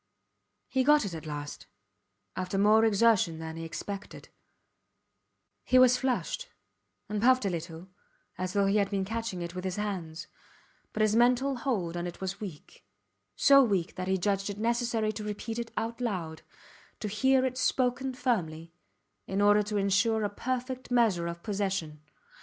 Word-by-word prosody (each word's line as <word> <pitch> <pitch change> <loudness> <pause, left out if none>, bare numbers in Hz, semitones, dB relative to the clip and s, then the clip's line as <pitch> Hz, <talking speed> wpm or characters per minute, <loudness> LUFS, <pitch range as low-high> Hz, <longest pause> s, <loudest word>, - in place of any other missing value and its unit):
He 260 -1 +1
got 295 -2 +5
it 190 - -5
at 160 -1 -7
last, 145 -1 -6 0.7
after 185 +1 -3
more 210 +3 +5
exertion 210 -6 +3
than 160 0 -6
he 165 - -6
expected; 200 +5 -7 1.3
he 255 - +3
was 255 -1 +7
flushed 270 - -2 0.6
and 210 -1 -2
puffed 255 -1 +4
a 195 - +1
little 170 +1 -6 0.5
as 185 0 -4
though 200 -1 +2
he 195 +2 +2
had 200 -1 +2
been 195 -2 -1
catching 225 -4 -4
it 170 0 -6
with 180 0 -5
his 185 -1 -2
hands, 185 -6 -4 0.7
but 215 - -2
his 215 0 +2
mental 250 +3 +3
hold 200 -10 -2
on 175 0 -3
it 175 - -8
was 190 +1 -4
weak, 180 -8 -9 0.5
so 275 0 +7
weak 195 -8 0
that 185 0 -5
he 190 0 +2
judged 195 +2 0
it 200 - -5
necessary 230 -1 0
to 215 0 -6
repeat 215 +2 -4
it 235 -1 -4
aloud 215 -8 -3 0.6
to 215 - -3
hear 265 +5 +2
it 255 -1 -2
spoken 260 0 0
firmly 165 - -2 0.5
in 195 - -2
order 205 +1 +5
to 210 0 -3
insure 205 +3 +2
a 205 - 0
perfect 255 +4 -4
measure 220 -9 +2
of 170 0 -6
possession. 190 -7 -2
205 Hz, 165 wpm, -29 LUFS, 185-235 Hz, 1.3 s, was